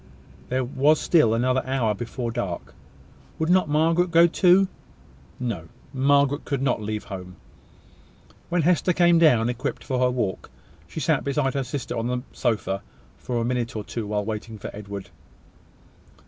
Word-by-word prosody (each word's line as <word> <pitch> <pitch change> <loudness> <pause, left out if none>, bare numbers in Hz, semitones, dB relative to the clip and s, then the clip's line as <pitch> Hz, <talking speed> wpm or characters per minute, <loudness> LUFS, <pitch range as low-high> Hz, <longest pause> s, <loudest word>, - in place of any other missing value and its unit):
There 130 +1 0
was 140 +5 +2
still 120 -10 +3
another 130 +2 +1
hour 130 -5 0
before 120 +2 -4
dark. 105 -7 -4 0.6
Would 160 +2 0
not 185 -4 +3
Margaret 165 +4 +2
go 170 0 +6
too? 180 +2 +4 0.7
No; 110 -10 -3 0.3
Margaret 140 +1 +2
could 140 -2 -2
not 125 -4 +1
leave 105 0 -3
home. 90 -3 -8 1.1
When 175 -1 +1
Hester 180 +2 +3
came 175 -1 +4
down, 125 -9 +5
equipped 125 +1 -3
for 130 -2 -2
her 125 0 +3
walk, 120 -7 -2 0.4
she - - -6
sat - - +1
beside 140 -1 0
her 140 - -1
sister 130 +2 -4
on 115 +1 -2
the 125 0 -2
sofa 105 -5 -1 0.4
for 120 -2 -2
a - - -1
minute 120 -1 -2
or 105 - -3
two, 110 0 -5
while 105 -1 -1
waiting 110 +1 -5
for - - -8
Edward. 100 -1 -8
125 Hz, 160 wpm, -24 LUFS, 110-150 Hz, 1.1 s, go